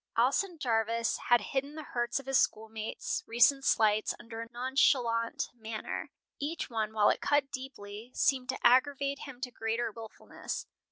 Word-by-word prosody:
Alson 305 +10 +2
Jarvis 230 -4 +1
had 240 -2 +6
hidden 275 +6 -3
the 310 - -6
hurts 240 -2 -1
of 275 - -11
his 270 -1 +3
schoolmates' 220 0 -2
recent 240 +4 +4
slights 215 -3 +3
under 230 0 -7
a 230 - -8
nonchalant 240 -2 +1
manner. 220 -2 -5 0.3
Each 300 -1 -3
one, 220 -2 -1
while 210 -1 +4
it - - -2
cut 290 -1 +2
deeply, 240 -5 -7
seemed 260 -3 +2
to 260 - -3
aggravate 275 +2 +4
him 260 -3 -10
to 255 -2 -4
greater 225 0 -2
wilfulness. 225 0 -7
240 Hz, 155 wpm, -31 LUFS, 225-270 Hz, 0.3 s, had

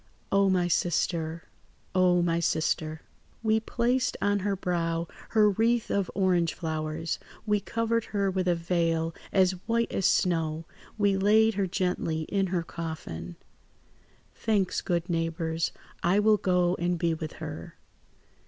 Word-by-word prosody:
"Oh, 195 0 +4
my 180 -2 +2
sister! 165 -1 0 0.5
Oh, 180 -1 +4
my 170 -1 +1
sister! 160 -1 -1 0.4
"We 220 0 +3
placed 240 +3 0
on 205 0 +1
her 200 +1 0
brow 170 -3 -1 0.2
her 215 -2 +5
wreath 230 +3 +1
of 200 -2 0
orangeflowers, 165 -4 0 0.3
we 210 -1 +2
covered 230 +1 -1
her 200 -2 0
with 185 -1 -1
a 175 - +3
veil 165 -1 0 0.2
as 185 -1 +4 0.2
white 230 0 +1
as 195 - +1
snow; 165 -4 +1 0.3
we 200 -2 +2
laid 220 +3 +4
her 195 -1 0
gently 175 -3 -1
in 195 -1 +1
her 175 -2 -1
coffin. 155 - -6 1.0
"Thanks, 205 -5 0
good 175 -1 -1
neighbours. 165 -1 -1 0.3
I 175 +3 +3
will 210 0 +5
go 180 -2 +2
and 175 +1 0
be 165 0 +1
with 160 -1 -5
her. 160 +1 -7
180 Hz, 135 wpm, -28 LUFS, 165-200 Hz, 1.0 s, her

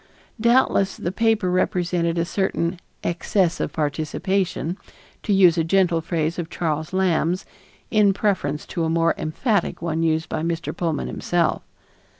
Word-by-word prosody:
Doubtless 235 -4 +3
the 175 - -3
paper 220 -3 +1
represented 175 -2 0
a 170 - +1
certain 175 -2 -1 0.2
"excess 175 0 0
of - - -2
participation," 165 +4 -1 0.5
to - - -2
use 180 -4 +5
a - - +2
gentle 175 -1 +2
phrase 165 0 -2
of 165 -2 -4
Charles 155 -3 -2
Lamb's 185 -2 +1 0.5
in 210 -3 +5
preference 185 -8 -1
to 170 - -3
a 160 - 0
more 165 0 +2
emphatic 200 +5 -1
one 165 -1 -2
used 160 -1 +1
by 155 - -3
Mr. 170 0 -3
Pullman 165 -4 -1
himself. 175 -2 0
170 Hz, 145 wpm, -23 LUFS, 165-190 Hz, 0.5 s, use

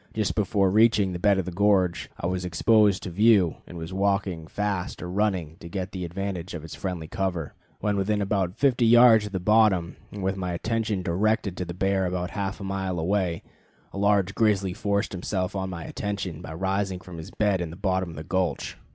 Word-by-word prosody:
Just 110 -2 0
before 100 -2 +1
reaching 105 -3 +4
the 90 - -4
bed 100 +2 +3
of 95 - -1
the 90 - -4
gorge 95 -2 +2
I - - -4
was 90 +1 -1
exposed 100 +4 +3
to 90 - -5
view, 100 -3 +4
and 90 - -9
was 80 +2 -6
walking 95 -4 0
fast 100 -1 -3
or - - -4
running 95 -6 -1
to 85 - -9
get 95 0 -4
the 90 -2 -4
advantage 90 0 -4
of 80 - -6
its 80 - -9
friendly 90 -5 -4
cover. 90 -4 -3 0.3
When 105 -1 0
within 105 +2 +1
about 95 -2 -1
fifty 125 -4 +3
yards 115 -2 +7
of - - -9
the 95 - -2
bottom, 100 -3 +3
and 100 -2 -6
with 95 +1 0
my 90 -2 -3
attention 110 0 -1
directed 100 +2 0
to 90 - -3
the 85 0 -7
bear 95 0 +1
about 90 -1 -3
half 100 -1 -3
a - - -7
mile 95 -2 -2
away, 90 -1 0 0.5
a 100 - -5
large 100 -1 +2
grizzly 100 -5 +2
forced 100 0 -1
himself 95 0 -3
on 95 -1 -2
my 85 -3 -6
attention 100 -6 -4
by 80 - -7
rising 95 +1 -1
from 90 -2 -10
his 80 - -8
bed 100 -4 +1
in 85 - -3
the 80 - -9
bottom 95 -1 -1
of 80 - -9
the 75 - -6
gulch. 95 0 -2
95 Hz, 210 wpm, -26 LUFS, 90-105 Hz, 0.5 s, yards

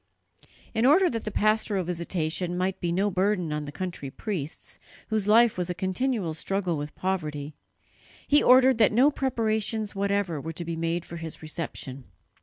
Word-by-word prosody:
In 225 - +1
order 335 +8 +5
that 230 -2 -4
the - - -1
pastoral 215 -2 +1
visitation 175 0 -2
might 185 +1 -1
be 175 - -1
no 195 +4 +1
burden 185 -3 0
on 150 0 -3
the 145 - -7
country 175 -5 -5
priests, 160 -1 -5 0.3
whose 215 -2 0
life 225 -1 +5
was 180 0 -1
a 180 - -2
continual 190 0 -1
struggle 185 +1 -1
with 145 0 -5
poverty, 155 -6 -3 0.7
he 290 +1 +5
ordered 255 -1 +6
that 215 - +5
no 255 +7 +5
preparations 220 -5 -1
whatever 200 -5 -1
were 165 +2 -5
to 170 +1 -5
be 165 0 -3
made 165 +1 -2
for 170 - -8
his 160 -1 -7
reception. 140 -4 -5
185 Hz, 170 wpm, -27 LUFS, 165-215 Hz, 0.7 s, ordered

